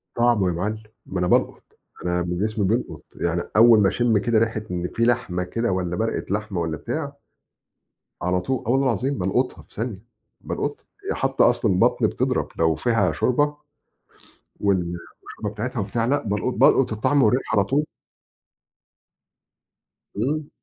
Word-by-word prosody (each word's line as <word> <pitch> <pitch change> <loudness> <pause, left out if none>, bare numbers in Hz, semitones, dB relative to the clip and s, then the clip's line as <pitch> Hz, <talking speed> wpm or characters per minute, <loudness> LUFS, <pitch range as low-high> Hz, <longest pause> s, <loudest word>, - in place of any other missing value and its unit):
طعمه 120 -5 +3
يا 90 - 0
معلّم، 105 +6 -3 0.2
ما 95 - -4
أنا 90 - +1
بالقُط، - - +1 0.4
أنا 90 0 0
من 90 0 -3
جسمي 105 0 0
بيلقط، 95 -7 -2
يعني 85 0 -1
أوّل 115 0 +7
ما 95 - +4
أشم 120 -1 +2
كده 115 +2 +2
ريحة 110 -1 0
إن 90 0 -2
في 115 - 0
لحمة 115 -7 0
كده 115 +5 -1
والّا 90 -2 -1
مَرقة 115 +3 -2
لحمة 105 -4 -2
والّا 80 -2 -2
بتاع 145 - -4 1.1
على 90 +1 +1
طول، 130 +7 -2
آه - - 0
والله 135 +2 +3
العظيم 130 +4 0
بَالقُطها 100 +8 -1
في - - -21
ثانية، 110 -2 -4 0.4
بالقطها، - - -4 0.3
ي - - -3
حتّى - - +1
أصلًا - - +3
البطن 90 - +3
بتضرب - - -1
لو 80 -1 +3
فيها 115 +2 +1
شوربة، 145 +4 +1 1.1
وال 90 -4 +1 0.3
والشوربة 105 - -6
بتاعتها 120 +4 -4
وبتاع 110 +3 -1
لأ 140 +4 +1
بَالقُط 105 +5 -1
بَالقُط 135 - +4
الطعم 140 +7 +2
والريحة 115 0 +2
على 100 - +5
طول. 140 +9 0 2.3
امم. 145 +8 -1
110 Hz, 155 wpm, -23 LUFS, 90-120 Hz, 2.3 s, أوّل